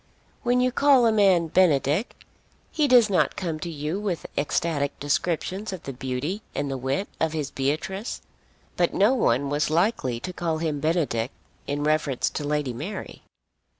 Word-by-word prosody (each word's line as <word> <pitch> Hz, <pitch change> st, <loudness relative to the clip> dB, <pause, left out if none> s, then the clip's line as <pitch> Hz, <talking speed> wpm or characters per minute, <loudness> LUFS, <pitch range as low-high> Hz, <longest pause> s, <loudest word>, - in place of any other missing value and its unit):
When 245 Hz, +1 st, +2 dB
you 255 Hz, 0 st, +2 dB
call 275 Hz, -2 st, +5 dB
a 225 Hz, -, +5 dB
man 190 Hz, -6 st, +4 dB
Benedick 160 Hz, -, +2 dB, 0.6 s
he 305 Hz, -3 st, +2 dB
does 245 Hz, -4 st, +6 dB
not 195 Hz, -3 st, +1 dB
come 165 Hz, -4 st, -3 dB
to 170 Hz, -, -5 dB
you 155 Hz, +4 st, -3 dB
with 195 Hz, -5 st, -3 dB
ecstatic 145 Hz, -1 st, -1 dB
descriptions 175 Hz, +8 st, -1 dB
of 185 Hz, -, -7 dB
the 135 Hz, -, -6 dB
beauty 135 Hz, -, -3 dB
and 140 Hz, -1 st, -2 dB
the 135 Hz, -, -2 dB
wit 135 Hz, +10 st, -1 dB
of 160 Hz, -1 st, 0 dB
his 150 Hz, -4 st, -3 dB
Beatrice. 155 Hz, -, -3 dB, 0.5 s
But 175 Hz, -1 st, +1 dB
no 210 Hz, +6 st, +4 dB
one 140 Hz, -, +1 dB
was 145 Hz, +1 st, +1 dB
likely 155 Hz, -, +1 dB
to 180 Hz, -, -5 dB
call 165 Hz, -2 st, -1 dB
him 155 Hz, -3 st, -2 dB
Benedick 155 Hz, -8 st, 0 dB, 0.4 s
in 145 Hz, +1 st, -2 dB
reference 150 Hz, -4 st, +1 dB
to 150 Hz, -, -4 dB
Lady 145 Hz, -3 st, -1 dB
Mary. 165 Hz, -, -6 dB
160 Hz, 165 wpm, -25 LUFS, 145-195 Hz, 0.6 s, does